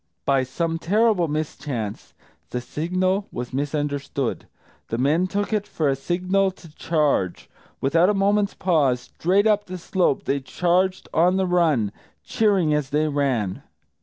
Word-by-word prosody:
By 135 -1 +3
some 165 +6 -2
terrible 205 -1 +2
mischance, 145 -8 -4 0.3
the 125 - -3
signal 185 +9 -1
was 125 +1 -6
misunderstood. 145 -2 -2 0.4
The 115 - -3
men 150 +8 +2
took 205 +3 -2
it 205 -1 0
for 155 -8 0
the - - 0
signal 185 +7 0
to 170 -4 -14
charge. 150 - 0 0.3
Without 165 +7 +3
a 210 - +2
moment's 200 +1 +2
pause, 145 -9 +2
straight 185 - +1
up 210 -1 +3
the 185 0 -6
slope, 180 -5 0
they 140 - 0
charged 180 +6 0
on 175 +3 +3
the 190 - +1
run, 160 - +2 0.3
cheering 195 -8 +2
as 150 -3 0
they 150 +2 +1
ran. 130 -10 -1
165 Hz, 145 wpm, -23 LUFS, 140-185 Hz, 0.4 s, By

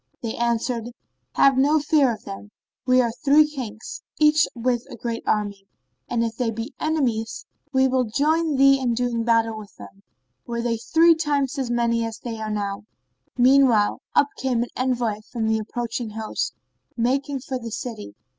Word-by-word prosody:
They 225 - -2
answered, 235 0 -1 0.5
"Have 275 -1 +4
no 290 +3 +4
fear 290 -3 +3
of 220 - -7
them; 195 +1 -8 0.4
we 255 0 +5
are 235 - 0
three 300 +1 +6
Kings, 255 - -7 0.2
each 305 0 +5
with 240 0 0
a - - -8
great 230 -1 -4
army, 200 -2 -1 0.4
and 235 -1 0
if 230 -1 -2
they 245 -2 0
be 225 +1 -5
enemies, 255 -8 -1 0.3
we 265 -1 +3
will 255 -1 +1
join 305 +6 +1
thee 275 0 +5
in 245 -3 0
doing 240 -1 -1
battle 225 -1 +2
with 215 -2 -10
them, 100 -1 -13 0.5
were 235 -1 -3
they 235 -1 0
three 330 +8 +4
times 290 -3 -1
as 260 -3 -2
many 235 -1 +1
as 225 -1 -4
they 230 -2 -6
now 200 -2 -2
are." - - -16 0.6
Meanwhile, 250 -4 +4
up 285 - +4
came 250 -3 0
an 240 - -7
envoy 245 -4 -1
from 225 -3 -2
the 220 0 +1
approaching 230 +1 -4
host, 220 0 -3 0.4
making 270 +3 0
for 260 -1 -4
the 230 -1 -6
city. 220 - -6
240 Hz, 175 wpm, -23 LUFS, 225-270 Hz, 0.6 s, three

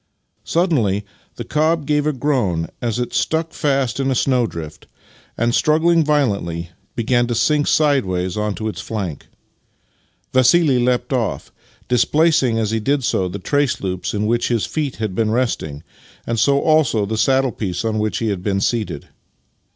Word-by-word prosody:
Suddenly 120 - +1 0.3
the - - -5
cob 155 0 0
gave 150 0 +1
a - - +3
groan 120 - -1
as 115 -2 -1
it 125 0 -3
stuck 160 0 0
fast 135 -4 0
in 135 0 0
a 130 - +1
snowdrift, 115 - -1 0.5
and, 120 +1 +1
struggling 160 +4 +3
violently, 100 - 0 0.2
began 120 +1 +1
to 120 - -1
sink 145 +5 +2
sideways 95 - +1
onto 105 0 -2
its 110 - -4
flank. 95 -9 -5 1.1
Vassili 130 +2 +4
leapt 125 +1 0
off, 120 -5 -2 0.4
displacing 130 0 +2
as 110 -1 0
he 115 - 0
did 135 +5 0
so 95 -5 0
the 90 +2 -5
trace 145 +7 0
loops 95 +1 -3
in 105 +1 -1
which 120 +2 +1
his 115 -3 0
feet 150 -4 -3
had 110 -3 -3
been 110 +3 0
resting, 110 - -2 0.4
and 115 -1 -1
so 140 +3 +3
also 140 -9 +2
the 110 +2 -3
saddle 130 +3 +2
piece 95 -3 -4
on 110 -1 0
which 105 0 -1
he 115 - -1
had 100 -3 -2
been 100 0 0
seated. 110 +2 -2
120 Hz, 160 wpm, -19 LUFS, 105-145 Hz, 1.1 s, Vassili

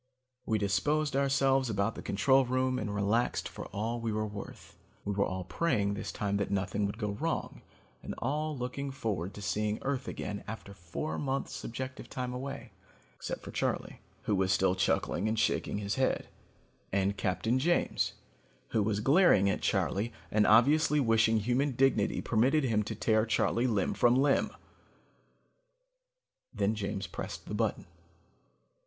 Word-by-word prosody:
We 110 - +2
disposed 145 +9 +1
ourselves 135 -1 +2
about 100 +1 0
the - - -8
control 135 +7 +3
room 130 0 0
and 105 -1 -3
relaxed 105 +4 +1
for - - -8
all 115 +4 -3
we 115 -1 -1
were 110 0 -1
worth. 105 -1 -9 0.3
We 100 - -1
were 100 0 +1
all 95 0 -4
praying 100 - 0
that 100 - -5
this - - -4
time 100 -1 -1
nothing 100 +1 0
would 100 - -5
go 105 -3 -2
wrong, 160 +11 -3 0.4
and - - -6
all 150 +4 -2
looking 125 +3 -4
forward 100 -8 -3
to 105 - -8
seeing 105 +2 0
Earth 135 -1 -2
again 105 0 -5
after 105 -2 -7
four 90 - -5
months 135 -1 -2
subjective 130 +1 -6
time 125 -1 -4
away, 135 +2 -6 0.4
except - - -5
for - - -7
Charley, - - -2 0.2
who 105 - +1
was 95 -1 +1
still 95 0 +3
chuckling 95 +1 0
and 110 +1 0
shaking 110 - +1
his 100 0 -2
head, 130 - +1 0.6
and 100 +1 +1
Captain 100 +6 0
James 175 +6 +1 0.6
who 110 - +1
was 105 0 0
glaring 135 - +5
at - - -3
Charley 110 +5 0 0.2
and 105 0 +3
obviously 150 +7 +5
wishing 115 -3 +3
human 130 +5 +1
dignity 120 -5 +2
permitted 130 +7 +2
him 110 -5 +2
to 110 - -4
tear 110 0 +2
Charley 115 +2 +2
limb 105 -6 +1
from 120 0 +4
limb. 135 +1 +3 2.0
Then 105 -3 0
James 100 -2 -3
pressed 85 - -6
the - - -6
button. - - -1
110 Hz, 160 wpm, -31 LUFS, 100-130 Hz, 2.0 s, glaring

